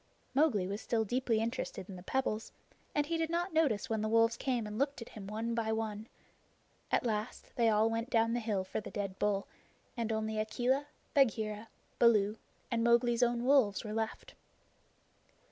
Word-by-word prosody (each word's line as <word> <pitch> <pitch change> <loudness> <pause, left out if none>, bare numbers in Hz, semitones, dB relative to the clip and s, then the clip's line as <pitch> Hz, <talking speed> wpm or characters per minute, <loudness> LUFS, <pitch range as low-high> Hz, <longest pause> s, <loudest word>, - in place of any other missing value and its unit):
Mowgli 265 -9 +3
was 200 +4 -4
still 225 -2 0
deeply 240 0 +1
interested 225 -4 -3
in 195 - -8
the 180 - -9
pebbles, 220 +1 -2 0.4
and 295 - +2
he 330 +2 -1
did 325 -1 0
not 345 +1 -1
notice 270 -8 +2
when 220 -3 -1
the 215 - -1
wolves 230 +1 +4
came 245 -4 -1
and 210 +2 -5
looked 280 +1 0
at 230 - -8
him 200 -3 -9
one 225 +3 -2
by 225 -1 0
one. 220 -1 -3 0.8
At - - +1
last 215 0 -3
they 230 -2 +4
all 215 +1 +4
went 230 +2 -2
down 230 -1 +3
the 240 - +1
hill 215 -4 -1
for 185 - -4
the - - -8
dead 200 -2 -4
bull, 200 -1 +1 0.5
and 230 -2 -2
only 220 0 -1
Akela, 250 +6 0 0.3
Bagheera, 220 -5 +2 0.3
Baloo, 215 -2 +4 0.3
and 230 -1 +1
Mowgli's 235 0 +3
own 240 0 +2
wolves 260 -7 +4
were 215 -1 -5
left. 220 0 -3
225 Hz, 180 wpm, -33 LUFS, 215-245 Hz, 0.8 s, wolves